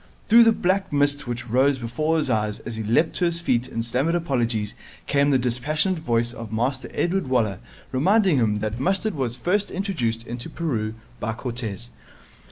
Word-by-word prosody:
Through 230 +1 +8
the 225 - +6
black 195 -1 0
mist 145 -1 +1
which 120 0 -4
rose 130 +4 +3
before 140 +7 -1
his 155 - 0
eyes 105 -1 0
as 115 - -6
he 110 - -3
leaped 115 +10 +2
to 180 - +2
his 170 -1 +1
feet 130 -6 0
and 115 -2 -3
stammered 135 +8 +1
apologies 120 -10 -1 0.3
came 140 0 +2
the 135 - +4
dispassionate 150 +9 0
voice 120 -5 0
of 115 -2 -8
Master 125 +3 -1
Edward 180 -2 0
Waller 110 -7 +1 0.3
reminding 185 +4 +3
him 105 -4 +2
that 110 +2 -3
mustard 195 +7 0
was 130 -4 -2
first 195 +9 0
introduced 125 - -2
into 120 +6 -6
Peru 115 -10 -2 0.2
by 110 +1 -2
Cortez. 110 - -5
130 Hz, 175 wpm, -24 LUFS, 115-165 Hz, 0.3 s, Through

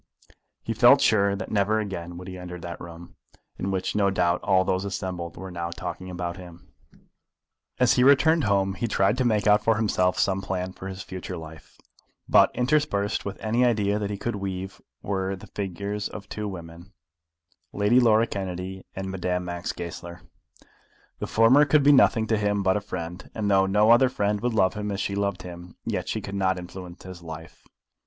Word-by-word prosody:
He - - -2
felt - - +7
sure 100 -2 +3
that 100 - -6
never 105 +1 +2
again 90 -4 -5
would 90 +1 -9
he 95 - -7
enter 90 -1 -8
that 85 0 -7
room, 85 0 -11 0.4
in 95 - -2
which 95 0 -2
no 100 -1 +3
doubt 90 -2 +1
all 95 -1 +3
those 95 0 0
assembled 90 -4 -5
were 95 +1 -7
now 85 -1 -4
talking 90 +1 -6
about 85 -1 -4
him. 90 -2 -13 1.0
As 125 0 +4
he 125 - +3
returned 145 +3 +5
home 100 -1 +2
he 115 - -2
tried 100 0 +2
to - - +3
make 105 -4 +2
out 105 0 +4
for 115 - +3
himself 90 -4 +1
some 95 0 +1
plan 95 -1 -3
for 95 - -8
his 95 0 -6
future 95 -1 -6
life, 80 -1 -12 0.5
but, - - +6
interspersed 125 -6 0
with 100 - -5
any 115 +3 +1
idea 105 -4 +2
that 100 -1 -2
he 100 - -3
could 120 +3 -3
weave 95 -1 -5 0.2
were 95 -1 -2
the 95 - -12
figures 100 +1 -4
of 105 - -9
two 105 -1 -4
women, 85 0 -9 0.8
Lady 105 +5 +3
Laura 115 -2 +4
Kennedy 95 -2 -5
and 95 0 -4
Madame 90 -1 -2
Max 85 -1 -4
Goesler. 85 0 -8 1.0
The - - -3
former 115 +6 +5
could 145 0 +3
be 145 - +7
nothing 120 -5 +5
to 110 -1 +1
him 105 -1 0
but 95 0 +3
a 105 - 0
friend; 90 -2 -7
and 105 -2 -1
though 95 0 +4
no 105 +3 +4
other 125 +2 +6
friend 105 -4 -1
would 120 -1 -1
love 95 -3 +3
him 105 0 -4
as 100 - -3
she 100 - -2
loved 100 -2 -2
him, 90 0 -10
yet - - -2
she - - -2
could 100 - -7
not 95 -1 +1
influence 90 0 -9
his 95 -2 -10
life. 80 -1 -10
95 Hz, 195 wpm, -25 LUFS, 90-105 Hz, 1.0 s, felt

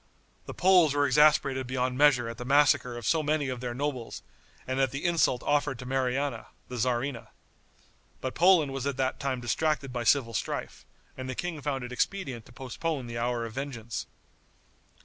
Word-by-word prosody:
The - - -7
Poles 180 -5 +5
were 145 0 +3
exasperated 140 -2 +3
beyond 130 0 -1
measure 135 -4 +4
at 115 - -7
the - - -4
massacre 135 -2 +3
of 120 - -7
so 160 - +2
many 150 -2 0
of 125 -1 -4
their 120 -1 -4
nobles 130 -3 -4 0.4
and 130 +1 -2
at 135 -1 +3
the 140 +5 -5
insult 165 -7 +2
offered 145 -3 +1
to 125 - -9
Mariana, 130 -1 -1 0.2
the 125 - -5
tzarina. 120 +1 -1 0.9
But 130 - -4
Poland 170 -6 +4
was 135 0 -3
at 140 -2 -2
that 130 -1 -1
time 135 -3 -2
distracted 140 +1 -1
by 120 -1 -2
civil 120 -3 +3
strife, 100 - -4 0.3
and 130 0 -6
the 130 - -3
king 170 -1 -4
found 135 -2 -2
it 125 - -7
expedient 130 - -2
to - - -16
postpone 135 +3 -4
the 115 0 -5
hour 120 0 -1
of 115 - -8
vengeance. 120 -4 -5
130 Hz, 185 wpm, -28 LUFS, 125-145 Hz, 0.9 s, Poles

